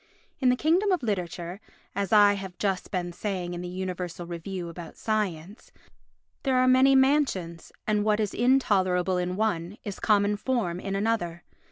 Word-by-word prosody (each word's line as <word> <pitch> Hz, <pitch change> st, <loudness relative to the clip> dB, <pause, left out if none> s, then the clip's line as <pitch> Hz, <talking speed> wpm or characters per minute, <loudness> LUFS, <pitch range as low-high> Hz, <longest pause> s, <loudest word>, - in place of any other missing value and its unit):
In 255 Hz, -, +3 dB
the 250 Hz, -, +4 dB
kingdom 345 Hz, +9 st, +2 dB
of 360 Hz, -7 st, +1 dB
literature 180 Hz, -3 st, -3 dB, 0.3 s
(as 200 Hz, -2 st, -2 dB
I 205 Hz, -1 st, +7 dB
have 190 Hz, -2 st, -7 dB
just 195 Hz, -3 st, -1 dB
been 175 Hz, -3 st, -3 dB
saying 180 Hz, -2 st, -3 dB
in 175 Hz, -, -5 dB
the 180 Hz, -, -5 dB
Universal 180 Hz, -1 st, -5 dB
Review 175 Hz, +1 st, -5 dB
about 170 Hz, -1 st, -9 dB
Science) 205 Hz, -3 st, -3 dB, 0.7 s
there 265 Hz, -2 st, +1 dB
are 255 Hz, 0 st, +4 dB
many 260 Hz, +1 st, +6 dB
mansions 265 Hz, -, +1 dB
and 210 Hz, -1 st, +1 dB
what 210 Hz, 0 st, +2 dB
is 210 Hz, -2 st, -1 dB
intolerable 190 Hz, -8 st, +2 dB
in 180 Hz, 0 st, -2 dB
one 200 Hz, -2 st, -1 dB
is 205 Hz, -2 st, -6 dB
common 205 Hz, -1 st, +2 dB
form 210 Hz, -7 st, -1 dB
in 195 Hz, +1 st, -4 dB
another. 195 Hz, -5 st, -1 dB
195 Hz, 165 wpm, -27 LUFS, 180-220 Hz, 0.7 s, I